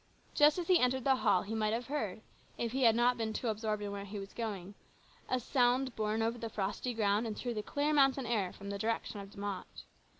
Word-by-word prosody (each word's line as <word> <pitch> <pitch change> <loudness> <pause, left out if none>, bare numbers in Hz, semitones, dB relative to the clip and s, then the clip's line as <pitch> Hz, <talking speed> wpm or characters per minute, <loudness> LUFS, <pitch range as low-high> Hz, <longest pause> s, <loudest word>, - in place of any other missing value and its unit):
Just 295 +2 +5
as 350 -2 -3
he 365 -2 +5
entered 250 0 +2
the 265 0 +4
hall 205 -7 +3
he 210 - -5
might 215 -1 +1
have 240 +2 -2
heard, 220 -8 -3 0.4
if 235 -1 -2
he 265 +2 -1
had 230 -3 +6
not 245 +1 +3
been 220 -1 -2
too 235 - -2
absorbed 215 -1 -2
in 205 - -3
where 200 0 -5
he 200 +1 -7
was 195 0 -7
going, 205 -5 -4 0.6
a 255 - +1
sound 250 +1 +2
borne 215 +1 0
over 230 +1 -1
the 230 - -4
frosty 205 +4 -2
ground 210 +1 +2
and 215 - -4
through 245 -1 -3
the 215 - -2
clear 290 +7 0
mountain 270 -2 +4
air 215 -6 0
from 200 0 -8
the 200 - -4
direction 225 -1 -2
of 195 0 -8
De - - -17
Mott. 200 -2 -5
225 Hz, 240 wpm, -33 LUFS, 205-250 Hz, 0.6 s, had